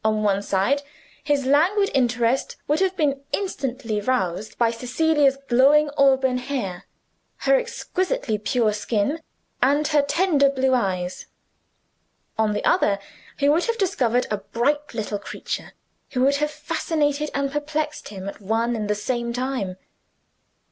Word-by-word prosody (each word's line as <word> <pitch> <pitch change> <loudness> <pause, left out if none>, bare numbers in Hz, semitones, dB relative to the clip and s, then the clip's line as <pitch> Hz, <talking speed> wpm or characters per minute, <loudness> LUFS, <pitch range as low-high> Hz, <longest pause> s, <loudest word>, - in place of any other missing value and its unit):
On 215 -1 +1
one 200 -1 +2
side 200 +9 +1 0.4
his 285 -3 +1
languid 355 +9 +3
interest 245 -1 +1
would 300 +2 +2
have 380 -1 +1
been 280 -3 0
instantly 260 - -2
roused 200 -4 -1
by 235 -1 +3
Cecilia's 275 +4 +2
glowing 285 +4 +5
auburn 265 -2 +3
hair, 245 -9 -4 0.6
her - - +5
exquisitely 475 - -1
pure 215 0 +1
skin, 215 +8 -1 0.4
and 285 +3 +3
her 300 -2 +4
tender 285 -1 +3
blue 265 -1 +1
eyes. 185 -6 -1 1.1
On 220 -1 +1
the 210 - -2
other, 200 - +3 0.4
he 285 - +2
would 315 +4 +3
have 465 -1 -1
discovered 250 - +1
a 210 - +1
bright 280 +7 -1
little 210 -2 -3
creature, - - -6 0.4
who 250 - 0
would 280 +1 +3
have 300 +1 0
fascinated 300 -1 -1
and 280 -1 0
perplexed 300 +1 -3
him 195 -2 -7
at 200 - -7
one 225 +4 0
and 210 -2 -3
the 210 - +2
same 235 +3 -2
time. 245 -7 -3
265 Hz, 140 wpm, -23 LUFS, 220-295 Hz, 1.1 s, glowing